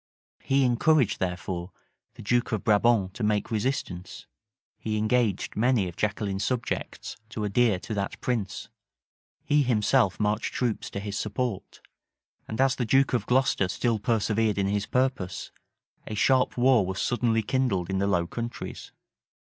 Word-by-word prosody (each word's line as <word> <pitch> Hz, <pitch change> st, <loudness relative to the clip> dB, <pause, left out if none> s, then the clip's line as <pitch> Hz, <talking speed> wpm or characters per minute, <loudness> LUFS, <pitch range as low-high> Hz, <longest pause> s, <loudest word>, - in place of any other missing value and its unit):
He 135 Hz, 0 st, +2 dB
encouraged, 130 Hz, +1 st, +3 dB
therefore, 90 Hz, 0 st, -3 dB, 0.4 s
the -, -, -10 dB
duke 120 Hz, +3 st, +1 dB
of 110 Hz, -4 st, -1 dB
Brabant 105 Hz, -3 st, +3 dB
to 115 Hz, -, -5 dB
make 105 Hz, +1 st, 0 dB
resistance: 105 Hz, -6 st, -3 dB, 0.5 s
he 110 Hz, -1 st, -2 dB
engaged 110 Hz, -2 st, 0 dB
many 115 Hz, -3 st, +2 dB
of 85 Hz, -, -8 dB
Jaqueline's 100 Hz, -2 st, -1 dB
subjects 125 Hz, -2 st, -3 dB
to 110 Hz, -2 st, -4 dB
adhere 105 Hz, 0 st, +2 dB
to 110 Hz, -, -5 dB
that 100 Hz, -2 st, -3 dB
prince: 115 Hz, -6 st, -3 dB, 0.8 s
he 145 Hz, 0 st, +3 dB
himself 120 Hz, -3 st, +2 dB
marched 105 Hz, +1 st, -1 dB
troops 120 Hz, -4 st, -1 dB
to -, -, -5 dB
his 100 Hz, 0 st, -4 dB
support: 110 Hz, 0 st, -3 dB, 0.7 s
and 110 Hz, -, -5 dB
as 135 Hz, 0 st, +3 dB
the 125 Hz, -, 0 dB
duke 135 Hz, +4 st, +3 dB
of 115 Hz, -5 st, 0 dB
Glocester 125 Hz, -6 st, +2 dB
still 115 Hz, +2 st, 0 dB
persevered 110 Hz, -1 st, +1 dB
in 100 Hz, -, +1 dB
his 100 Hz, +1 st, -1 dB
purpose, 125 Hz, -9 st, -1 dB, 0.6 s
a 110 Hz, -, -4 dB
sharp 130 Hz, +4 st, +2 dB
war 125 Hz, -3 st, +5 dB
was 95 Hz, +1 st, -4 dB
suddenly 115 Hz, -2 st, +1 dB
kindled 105 Hz, -7 st, 0 dB
in 95 Hz, 0 st, -1 dB
the 100 Hz, -, +1 dB
Low 90 Hz, -4 st, +1 dB
Countries. 120 Hz, +6 st, -6 dB
110 Hz, 150 wpm, -27 LUFS, 100-125 Hz, 0.8 s, war